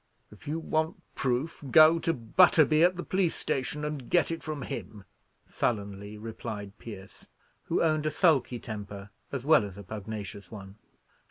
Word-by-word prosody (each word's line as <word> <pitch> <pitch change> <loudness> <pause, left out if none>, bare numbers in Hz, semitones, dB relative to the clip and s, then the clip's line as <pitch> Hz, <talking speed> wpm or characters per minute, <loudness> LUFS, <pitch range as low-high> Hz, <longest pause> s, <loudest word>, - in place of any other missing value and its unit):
"If 105 - -15
you 155 +2 -1
want 160 0 -1
proof, 135 +5 -2
go 160 +3 +7
to 165 - +1
Butterby 155 +4 +4
at 180 +2 +5
the 175 - -3
police 185 -3 0
station, 150 +3 -2
and 150 -4 -5
get 175 -2 +3
it 165 - -4
from 155 -3 -5
him," 105 -3 -7 0.4
sullenly 100 -1 -3
replied 105 -2 -7
Pierce, 100 -4 -10 0.4
who - - +1
owned 155 -2 +1
a - - +3
sulky 150 -6 +2
temper 100 -3 -7 0.2
as 135 -2 -4
well 155 -5 +6
as 100 -2 -7
a 100 - -8
pugnacious 100 -1 -7
one. 100 -1 -10
125 Hz, 160 wpm, -29 LUFS, 105-155 Hz, 0.4 s, go